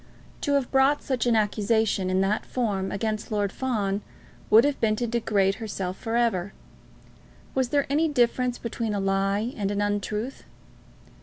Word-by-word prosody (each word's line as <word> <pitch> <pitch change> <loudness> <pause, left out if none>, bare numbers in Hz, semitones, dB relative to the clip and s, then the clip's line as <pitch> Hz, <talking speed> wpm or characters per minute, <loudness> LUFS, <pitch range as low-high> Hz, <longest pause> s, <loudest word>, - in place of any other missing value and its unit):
To 285 - 0
have 275 -3 +1
brought 270 +2 +3
such 250 -3 -1
an 235 - +3
accusation, 210 -2 +1
in 185 +1 +2
that 200 +2 -1
term, 200 -6 -1
against 215 +2 -3
Lord 205 -2 0
Fawn, 210 -6 -1 0.5
would 220 +2 +7
have 290 -1 -1
been 215 -1 +3
to 240 - -1
degrade 215 -3 +1
herself 195 -4 -3
for 225 +2 -4
ever. 205 -6 +1 1.0
Was 260 -2 0
there 285 0 +2
any 305 +4 +2
difference 250 -3 +1
between 230 -2 -3
a - - -1
lie 195 +4 0
and 200 -2 -2
an 205 0 -1
untruth? 205 +4 -2
220 Hz, 160 wpm, -26 LUFS, 200-245 Hz, 1.0 s, would